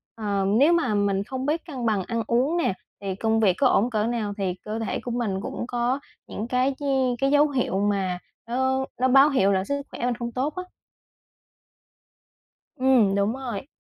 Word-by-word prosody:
ờ, 205 -3 -1
nếu 270 +12 +4
mà 335 -10 +1
mình 200 -1 +1
không 260 +3 -5
biết 310 +3 -1
cân 265 -8 -5
bằng 205 -4 +1
ăn 230 +1 -2
uống 265 +9 +1
nè, 330 - +1 0.3
thì 195 -2 -3
công 225 +2 +1
việc 195 -5 +4
có 275 - +4
ổn 240 0 +3
cỡ 215 -3 0
nào 225 -4 -2
thì 190 -2 -1
cơ 215 +1 -3
thể 225 - -2
của 245 - -6
mình 220 -5 -2
cũng 230 - -5
có 245 +3 0 0.3
những 215 - -5
cái 255 +2 +1
chi 290 - -6 0.4
cái 275 +1 +2
dấu 295 +1 +5
hiệu 250 -8 -1
mà 195 -3 0 0.3
nó 260 +2 0 0.2
nó 260 - +4
báo 270 +3 +6
hiệu 200 -9 +3
là 190 -1 +1
sức 280 +6 -2
khỏe - - -4
mình 245 -1 0
không 235 0 -5
tốt 270 +5 -2
á. 365 - -4 2.1
Ừm, 255 -7 +4
đúng 200 +2 +1
rồi. 255 -4 -5
235 Hz, 200 wpm, -25 LUFS, 205-265 Hz, 2.1 s, báo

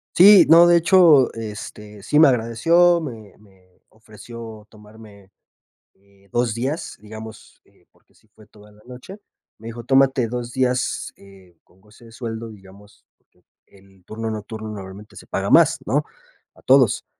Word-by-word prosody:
Sí, 200 +2 +7
no, 170 +1 +7
de 175 - +4
hecho, 170 -5 +4
este, 105 -1 -10
sí 150 +8 +1
me 160 - +7
agradeció, 165 +9 +2
me 115 - -10
me 95 -3 -27
ofreció 110 0 -13
tomarme, 105 -2 -18 0.6
eh, 100 0 -29
2 120 -2 -1
días, 135 +7 -5
digamos, 110 +1 -13
eh, - - -31
porque - - -34
sí - - -30
fue 110 -1 -21
toda 105 0 -20
la 105 0 -23
noche. 130 +11 -12 0.4
Me 110 - -12
dijo, 115 +1 -9
tómate 135 -1 +1
2 120 +1 -6
días, 125 -1 -2
eh, 95 -3 -20
con 95 - -30
goce 105 +3 -21
de 115 - -16
sueldo, 115 -1 -8
digamos, 100 0 -18
porque - - -39 0.2
el 95 -1 -24
turno 110 +2 -6
nocturno 110 +1 -8
normalmente 100 0 -11
se - - -14
paga - - -4
más, - - +4
¿no? - - -1 0.5
A - - -22
todos. 130 -4 +2
110 Hz, 155 wpm, -20 LUFS, 105-125 Hz, 0.6 s, Sí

